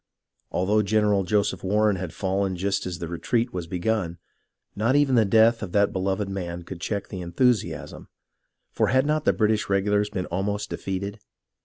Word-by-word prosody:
Although 105 +4 +2
General 105 -1 +2
Joseph 100 +3 0
Warren 105 +1 +2
had 90 -2 -5
fallen 95 +1 -1
just 100 +1 -1
as 90 -1 -4
the 85 -2 -5
retreat 115 +8 -1
was 90 -2 -4
begun, 90 0 -1 0.6
not 115 +6 +1
even 145 -2 +3
the 115 -3 +5
death 110 +3 +4
of 100 -5 -6
that 100 0 +3
beloved 95 +2 -1
man 90 -3 -5
could 85 0 -9
check 100 +1 -3
the 95 - -6
enthusiasm, 105 +7 -1 0.6
for - - +1
had 130 +1 +3
not 155 0 0
the - - +5
British 110 -1 +1
regu 100 +1 +1
lars 105 0 +2
been 95 -4 -3
almost 100 +3 -3
defeated 100 +3 -4
100 Hz, 175 wpm, -25 LUFS, 95-110 Hz, 0.6 s, the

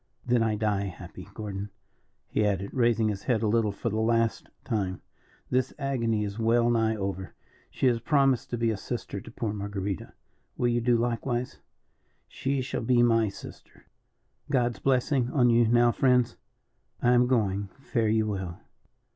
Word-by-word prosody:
"Then 120 -1 +2
I 110 -1 +1
die 105 -2 0
happy. 95 - -9
Gordon," 105 -1 -5 0.6
he 110 - 0
added, 100 -1 -1
raising 115 -3 +2
his 100 -2 -3
head 115 -3 +1
a - - +2
little 110 -1 +2
for 110 +3 -3
the 110 - -1
last 115 0 +1
time, 100 -7 -2 0.5
"this 130 0 0
agony 115 -6 0
is 100 +1 -5
well 115 +1 +3
nigh 110 -1 +2
over. 95 -3 -4 0.3
She - - -2
has 120 -2 +3
promised 135 0 +2
to 120 - -2
be 115 -1 +1
a 110 - -3
sister 100 -2 -5
to - - -11
poor 115 -2 -3
Marguerita; 100 -2 -4 0.4
will 120 - +2
you 120 0 +1
do 120 0 +3
likewise?" 120 +1 -2 0.7
"She 135 0 -2
shall 130 - -3
be 120 +1 +3
my 115 -2 +3
sister." 100 - -12 0.6
"God's 120 -4 +1
blessing 130 -1 +1
on 125 -4 +4
you 115 0 +4
now 120 +1 +4
friends. 125 -1 +2 0.7
I 120 - +5
am 125 0 +4
going, 100 -5 0
fare 115 -5 -1
you 110 0 +2
well. 95 -5 -4
115 Hz, 165 wpm, -27 LUFS, 105-120 Hz, 0.7 s, I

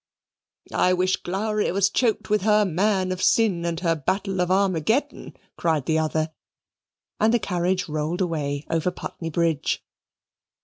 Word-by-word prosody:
"I 180 - +3
wish 185 +1 +1
Glowry 210 +3 -1
was 195 +1 +3
choked 230 -2 +1
with 210 - +3
her 210 +1 +4
Man 190 +1 +1
of 185 0 -3
Sin 200 -7 +3
and 165 -1 -2
her 165 -2 +2
Battle 190 +5 -1
of 180 - 0
Armageddon," 195 - 0 0.2
cried 160 -5 0
the 160 0 +1
other, 155 0 -1 0.9
and 220 +1 +4
the 240 - +4
carriage 185 -3 -1
rolled 155 +2 -2
away 150 -5 -2
over 165 +2 0
Putney 170 -2 -6
Bridge. 165 -2 0
180 Hz, 145 wpm, -24 LUFS, 165-200 Hz, 0.9 s, her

